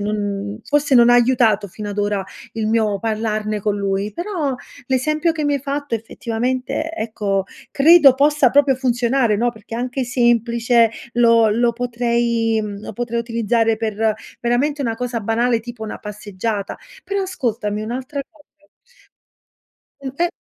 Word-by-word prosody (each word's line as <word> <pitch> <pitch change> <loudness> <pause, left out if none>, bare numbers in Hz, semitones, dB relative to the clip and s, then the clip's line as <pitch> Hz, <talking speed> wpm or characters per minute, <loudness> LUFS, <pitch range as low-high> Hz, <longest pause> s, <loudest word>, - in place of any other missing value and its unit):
non 205 0 -3
forse 290 -2 +1
non 240 0 +6
ha - - +6
aiutato 230 -4 +3
fino 210 +3 -7
ad 205 - -6
ora 205 -1 0 0.3
il 220 -1 -2
mio 215 -2 +1
parlarne 215 -1 -2
con 205 0 -1
lui; 200 +1 -2
però 345 - -2 0.3
l'esempio 305 +5 +1
che 310 -2 -3
mi 290 0 +1
hai 280 - -1
fatto, 285 -2 -3
effettivamente, 250 +7 -3
ecco, 210 - -2 0.3
credo 290 -2 +7
possa 285 -1 +3
proprio 280 0 +4
funzionare, 245 -2 +1
no? 240 +3 +1
Perché 220 0 -11
è - - -3
anche 250 +2 -2
semplice, 235 -1 +2 0.2
lo 230 -2 +5
lo 235 +2 +2
potrei 235 -2 0
mhmm, 205 -1 -6
lo 215 - -8
potrei 235 +1 -2
utilizzare 230 -1 +1
per, 220 0 0 0.3
veramente, 275 +5 0
una 225 -3 -2
cosa 245 -1 -3
banale 230 +2 +1
tipo 235 -1 -8
una 215 - -6
passeggiata. 205 0 -4 0.3
Però 400 0 -1
ascoltami, 225 - -2
un'altra 260 +5 -4
cosa 310 -3 -24 1.6
Mh, 270 -1 -5
e 345 0 +2
235 Hz, 150 wpm, -20 LUFS, 215-260 Hz, 1.6 s, credo